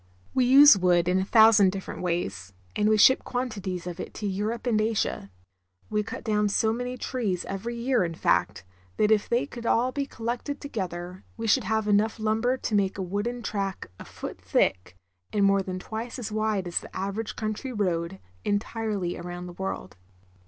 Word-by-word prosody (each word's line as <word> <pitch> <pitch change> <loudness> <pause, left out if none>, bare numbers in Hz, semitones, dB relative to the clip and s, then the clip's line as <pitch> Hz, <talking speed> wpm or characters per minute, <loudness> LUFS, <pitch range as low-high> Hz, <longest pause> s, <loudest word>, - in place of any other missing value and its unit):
We 255 - +3
use 275 +1 +9
wood 175 -1 +3
in 180 +1 +3
a - - +1
thousand 220 -3 +6
different 190 0 -6
ways, 95 - -3 0.2
and 210 - +2
we 215 - +4
ship 260 +5 +6
quantities 205 -8 -4
of 180 0 -6
it - - -7
to 215 - -5
Europe 210 +5 -2
and 220 -3 +2
Asia. 215 - -1 0.6
We 210 0 +1
cut 210 - -7
down 210 -2 +1
so 220 +2 +2
many 245 +2 -4
trees 210 -11 -2
every 220 +5 -4
year, 240 -2 +1
in 165 -1 -3
fact, 90 - +1 0.3
that 210 0 +3
if 210 -1 +2
they 240 +1 +2
could 235 -4 -7
all 250 +3 +2
be 280 +1 -3
collected 240 +4 -4
together 185 - -5
we 225 - -4
should 225 +1 +3
have 220 +1 0
enough 210 +2 +2
lumber 220 +4 +1
to 235 - -4
make 195 -2 +1
a 190 - -2
wooden 205 +6 -3
track 195 - -3
a - - -9
foot - - -8
thick, 90 -1 0 0.3
and 205 -1 +2
more 195 0 +4
than 185 -1 -5
twice 225 +6 -6
as 225 -4 -5
wide 215 -3 0
as 175 - 0
the - - -13
average 200 +3 -3
country 215 +4 -4
road, 185 -4 -1 0.3
entirely 205 -3 -2
round 175 0 -6
the 175 - -9
world. 175 - -5
210 Hz, 190 wpm, -26 LUFS, 185-230 Hz, 0.6 s, use